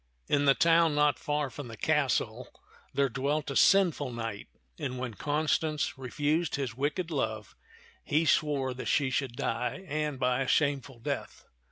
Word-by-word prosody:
In 145 0 +2
the 135 -1 +5
town 165 -2 +4
not 150 0 +3
far 145 -2 -1
from 145 -4 -7
the 115 -2 -9
castle - - 0 0.4
there 140 0 +2
dwelt 140 +4 -1
a - - -4
sinful 170 -9 +4
knight, 115 -3 -5 0.3
and 130 0 -3
when 125 -2 -4
Constance 150 +3 0
refused 145 +5 -1
his 135 -4 -3
wicked 145 +6 -2
love, 110 -8 -3 0.5
he 155 +3 +1
swore 145 -5 +2
that 125 - -6
she 140 -3 +2
should 130 -2 -1
die, 125 +13 -2
and 150 -2 -2
by 125 0 +1
a 130 - -1
shameful 140 -3 +1
death. 115 - -5
140 Hz, 160 wpm, -29 LUFS, 130-150 Hz, 0.5 s, the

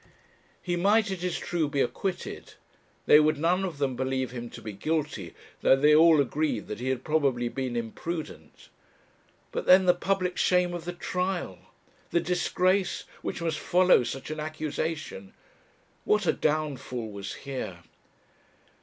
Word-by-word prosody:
He 175 -1 -1
might, 205 +4 +3
it 185 -2 -4
is 180 -2 -1
true, 165 -4 -1
be 140 -1 -2
acquitted; 180 +8 -3 0.5
they 150 - +8
would 155 0 +3
none 175 +5 +1
of 175 -6 -4
them 135 -3 -1
believe 130 0 -1
him 120 -1 -6
to - - -10
be 110 - -7
guilty, 145 - -3 0.3
though - - +6
they 150 +3 +4
all 160 0 +7
agreed 150 +3 0
that 105 - -5
he 130 +2 -2
had 130 -1 -2
probably 135 -6 +1
been 130 -1 -3
imprudent; 120 - -6 0.8
but - - -4
then 185 +1 +7
the 180 - +6
public 185 0 -1
shame 180 -1 +3
of 170 -1 -6
the 175 - -4
trial! 180 - -3 0.5
the 170 - +2
disgrace 180 +1 +1 0.2
which 170 - -4
must 160 -2 -1
follow 180 -6 +4
such 135 +5 -5
an 155 - -4
accusation! 155 -7 -4 0.7
What 210 -1 +2
a - - +3
downfall 135 -7 -2
was 100 -1 -6
here! 130 -10 -6
155 Hz, 155 wpm, -27 LUFS, 130-175 Hz, 0.8 s, they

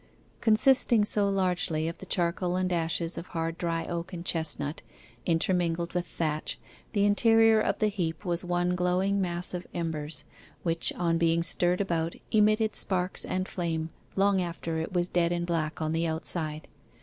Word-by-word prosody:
Consisting 235 0 +5
so 205 -1 +1
largely 180 -5 0
of 165 - -5
the - - -10
charcoal 175 0 0
and 185 0 0
ashes 165 0 -1
of 175 - -9
hard 165 0 -3
dry 165 -1 -1
oak 170 +1 -4
and 170 0 -6
chestnut, 155 -3 0 0.5
intermingled 170 0 +1
with 180 0 -1
thatch, 155 -2 -2 0.4
the 205 -2 +3
interior 225 +1 +5
of - - 0
the 215 - +2
heap 185 -3 -3
was 175 0 -1
one 175 0 0
glowing 185 +3 +1
mass 175 -1 0
of 180 0 -5
embers, 160 -3 -3 0.4
which, 165 -1 +2
on 165 -1 0
being 165 0 +2
stirred 180 +2 +2
about, 170 -3 -1 0.2
emitted 215 0 +3
sparks 185 -1 0
and 185 +1 -2
flame 165 -2 -3 0.2
long 195 -1 +3
after 165 -2 -3
it 160 - -4
was 175 -1 +1
dead 175 -1 +1
and 175 0 -1
black 165 -3 -2
on 155 0 -1
the 165 +1 +1
outside. 160 -1 -3
175 Hz, 165 wpm, -28 LUFS, 165-185 Hz, 0.5 s, Consisting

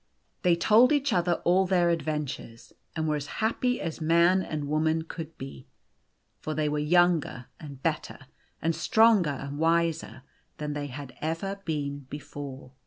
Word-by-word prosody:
They 175 -2 +4
told 220 - +5
each 285 -2 +2
other 175 -1 +2
all 185 +2 +3
their 175 -2 +3
adventures, 150 -7 -4 0.2
and 160 -1 -1
were 150 -1 +1
as 145 0 -6
happy 245 +3 0
as 165 0 -5
man 170 +4 +4
and 150 -5 -4
woman 160 +2 +1
could 165 -1 -8
be. 130 - -9 0.7
For 155 - -4
they 155 0 0
were 150 0 0
younger 165 -4 +2
and 140 -4 -10
better, - - -2 0.5
and 165 0 +1
stronger 215 0 +4
and 140 +1 -5
wiser, 165 -3 0 0.3
than 150 -1 -3
they 145 -1 -3
had 135 -1 -8
ever 170 +6 -3
been 145 -3 -3
before. 145 -2 -8
160 Hz, 155 wpm, -27 LUFS, 145-175 Hz, 0.7 s, told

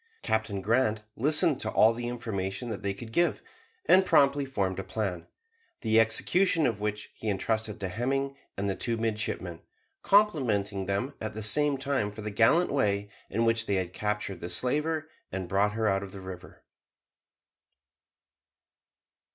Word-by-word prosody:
Captain 110 -3 -1
Grant 110 0 +1
listened 150 +3 +3
to - - -2
all 110 +1 +5
the 120 +1 -4
information 115 -2 -4
they 100 0 -1
could 110 +4 -8
give, 175 +8 +1 0.4
and 190 - +6
promptly 140 -4 +3
formed 95 -8 -1
a - - -3
plan, 95 -6 -3 0.5
the 110 0 +3
execution 165 - +2
of 115 -4 0
which 105 0 -3
he 110 - -4
entrusted 110 +2 -1
to 95 - -2
Hemming 135 +7 -1 0.2
and 100 +1 -1
the 95 - 0
two 115 +3 -1
midshipmen, 110 -1 -3 0.4
complimenting 110 - +2
them 100 +8 -1
at 110 -1 -4
the 110 - -4
same 145 +6 +2
time 135 -5 -1
for 105 +1 -9
the 105 - -4
gallant 115 - +3
way 100 -6 0 0.2
in 115 +1 0
which 115 0 +2
they 100 - +1
had 90 -2 -2
captured 105 -2 -3
the 85 - -5
slaver 150 - 0 0.2
and 95 -1 -4
brought 100 +3 +1
her 110 0 0
out 95 -1 +2
of 100 -1 -8
the 100 - -8
river. 95 -1 -10
110 Hz, 160 wpm, -28 LUFS, 100-130 Hz, 0.5 s, and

